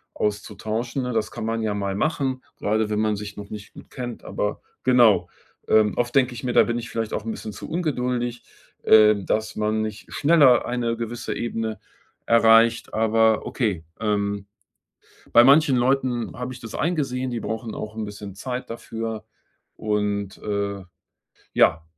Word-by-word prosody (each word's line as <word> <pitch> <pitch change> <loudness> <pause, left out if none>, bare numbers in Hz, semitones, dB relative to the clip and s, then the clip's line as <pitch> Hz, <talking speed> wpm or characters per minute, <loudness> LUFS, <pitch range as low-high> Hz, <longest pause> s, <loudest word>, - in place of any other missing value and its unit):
auszutauschen, 110 +4 -2
ne? 125 0 -3
Das 110 -1 -1
kann - - -5
man 115 0 -1
ja 105 -1 0
mal 100 -1 -2
machen, 135 0 -1
grade 110 +1 0
wenn 105 0 0
man 110 -1 +1
sich 100 0 -7
noch 100 -1 -8
nicht 105 -1 -9
gut - - -13
kennt, 120 -2 -6
aber 105 0 -3 0.2
genau. 120 -5 +5 0.4
Ähm, 110 -1 +4
oft 120 0 0
denke 130 -2 +3
ich 120 - -8
mir, 125 - -1
da - - +7
bin 120 0 -1
ich 115 - -7
vielleicht 115 -1 -3
auch - - -2
'n 115 - -2
bisschen 110 -1 -7
zu 100 - -9
ungeduldig, 125 -7 -2 0.4
ähm, 105 -2 +6
dass 110 0 -1
man 110 0 0
nicht 110 -1 -6
schneller 145 -5 +5
eine 120 -1 -1
gewisse 120 0 -4
Ebene 115 -2 -3 0.5
erreicht, 115 0 +4
aber 110 0 +3
okay. 100 -10 -2
Ähm, 100 -2 -1 0.9
bei 120 - +8
manchen 140 +1 +6
Leuten 125 -1 0
habe 125 +1 -4
ich 125 - -10
das 115 -2 -9
eingesehen, 135 -6 -1
die 120 -1 -3
brauchen 110 +2 -4
auch 110 0 -6
'n 110 - -3
bisschen 105 -1 -8
Zeit 125 +3 -5
dafür 115 -1 -5 0.5
und, 105 -2 -1
äh 100 -1 -3 0.7
ja. 80 - +4
115 Hz, 165 wpm, -24 LUFS, 105-125 Hz, 0.9 s, bei